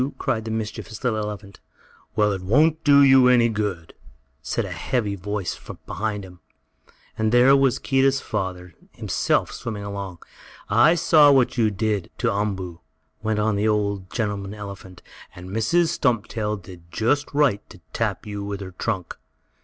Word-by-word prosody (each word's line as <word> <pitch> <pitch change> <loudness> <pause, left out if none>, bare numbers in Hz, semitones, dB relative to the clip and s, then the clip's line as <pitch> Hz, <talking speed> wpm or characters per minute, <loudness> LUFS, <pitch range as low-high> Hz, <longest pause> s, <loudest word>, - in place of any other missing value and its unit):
cried 115 -5 -2
the - - -4
mischievous 110 0 -5
little 115 -4 0
elephant. 105 -1 -6 0.6
"Well, 105 -1 +3
it 95 -2 -3
won't 150 - +2
do 140 -1 +6
you 130 -2 +7
any 120 -2 +5
good," 100 -6 -3 0.5
said - - -2
a - - -7
heavy 110 -6 -1
voice 100 -1 -3 0.3
behind 105 +1 -3
him, 90 -1 -14 0.8
and 110 -1 +1
there 125 +3 +6
was 135 -2 +3
Keedah's 135 0 +2
father 90 -6 -4 0.2
himself - - 0
swimming 105 -3 -6
along. 100 -3 -6 0.5
"I 120 +11 +5
saw 155 -3 +6
what 130 -3 +3
you 115 -3 +3
did 105 -1 -2
to 120 -3 0
Umboo," 95 -4 -3 0.4
went 110 -1 -1
on 105 0 +1
the 105 +2 +1
old 100 -3 -1
gentleman 105 -3 -3
elephant, 100 -3 -10 0.3
"and 90 +1 -10
Mrs. 160 - +2
Stumptail 110 -4 -1
did 90 -3 -14
just 130 +10 0
right 140 -8 +2
to - - -14
tap - - -2
you 105 -1 -5
with 100 -1 -4
her 95 -1 -7
trunk. 90 0 -3
105 Hz, 155 wpm, -23 LUFS, 100-120 Hz, 0.8 s, you